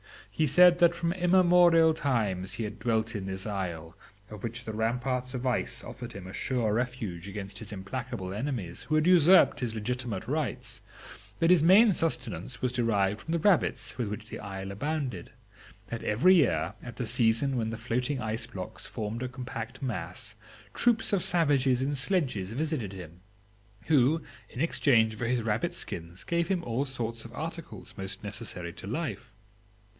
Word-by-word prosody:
He 155 - +1
told 140 - -3
them 180 -1 +8
that 170 -1 +5
from 170 0 -1
immemorial 175 -3 +5
times 105 -11 -1
he 115 - -3
had 105 0 -6
dwelt 110 0 0
in 100 -2 -4
this 95 0 -4
isle, 85 -6 -4 0.4
of 105 -2 -9
which 120 +1 -4
the 110 - -4
ramparts 125 +3 -1
of 125 +1 -4
ice 125 - -1
offered - - -8
him 100 -2 -8
a 95 - -9
sure 120 -2 0
refuge 110 -7 -3
against 100 0 -6
his 110 -3 -8
implacable 105 0 -5
enemies, 105 -7 -3
who 155 - -1
had 155 0 +3
usurped 180 +1 +6
his 120 -3 -2
legitimate 110 -2 -3
rights; 150 0 -3 0.6
that 165 +1 +3
his 180 -4 +6
main 200 +7 +7
subsistence 130 -6 -2
was 125 - +1
derived 105 -4 +1
from 160 - -4
the - - +3
rabbits 190 0 +2
with 120 - 0
which 105 +2 -6
the - - -6
isle 95 -1 -6
abounded; 130 - -3 0.6
that 115 +1 -4
every 120 - +4
year, 160 -8 +3
at 120 -2 -9
the 125 - -3
season 115 +3 +2
when 115 -2 -1
the 115 - -4
floating 125 +4 -1
ice 110 +1 -2
blocks 95 -6 -7
formed 110 +2 -4
a 130 - -2
compact 125 -1 -7
mass, 105 -1 -4 0.4
troops 235 -3 +2
of 195 - +2
savages 140 -7 +2
in 140 +2 -1
sledges 130 - 0
visited 140 - -2
him, 90 -2 -10 0.7
who, 150 +1 +3 0.3
in - - -9
exchange 115 -9 +3
for 115 +1 -3
his 120 -1 0
rabbit 115 +11 -1
skins, 85 - -5
gave 170 +9 0
him 185 -2 0
all 120 +4 -1
sorts 115 -4 -4
of 115 0 -11
articles 165 +2 -6
most 95 +1 -5
necessary 105 -5 -4
to 95 - -9
life. 125 -1 -4
120 Hz, 175 wpm, -29 LUFS, 105-150 Hz, 0.7 s, them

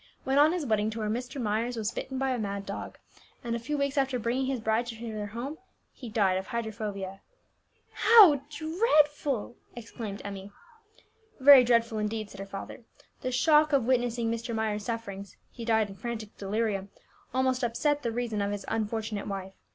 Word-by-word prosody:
When 270 +1 +2
on 300 +2 +6
his 350 -4 -2
wedding 215 -3 +1
tour, 220 -1 -3
Mr. 250 +4 -4
Myers 230 +2 -1
was 220 0 -1
bitten 265 +2 -5
by 270 0 0
a 250 - -1
mad 200 -2 -3
dog, 200 - -6 0.5
and 235 -1 -2
a - - -2
few 290 +6 -3
weeks 280 0 0
after 265 -2 +1
bringing 245 +3 -1
his 265 -2 -1
bride 220 +2 0
to 235 - -5
their 215 -3 -5
home 245 +9 -6 0.3
he 245 - -9
died 195 -4 +2
of 190 - -8
hydrophobia." 210 -4 -4 0.7
"How 410 - +7
dreadful!" 300 - +1 0.2
exclaimed 225 -3 -7
Emmie. 200 0 -7 0.9
"Very 270 -1 +9
dreadful 230 -2 +2
indeed," 215 0 -3
said 195 - -11
her 195 - -6
father. 195 +4 -8 0.4
"The 255 - -2
shock 300 +4 +4
of 270 -5 +3
witnessing 240 -2 +1
Mr. 230 0 -3
Myers' 215 -2 -1
sufferings 200 -4 -5
(he 230 - -8
died 220 -2 +2
in 195 - -9
frantic 220 0 -6
delirium) 200 -1 -2 0.4
almost 260 0 +1
upset 290 +5 +1
the 235 - -2
reason 225 -3 -2
of 200 0 -1
his 205 -1 -4
unfortunate 220 -1 -2
wife. 195 -1 -5
230 Hz, 175 wpm, -28 LUFS, 210-260 Hz, 0.9 s, Very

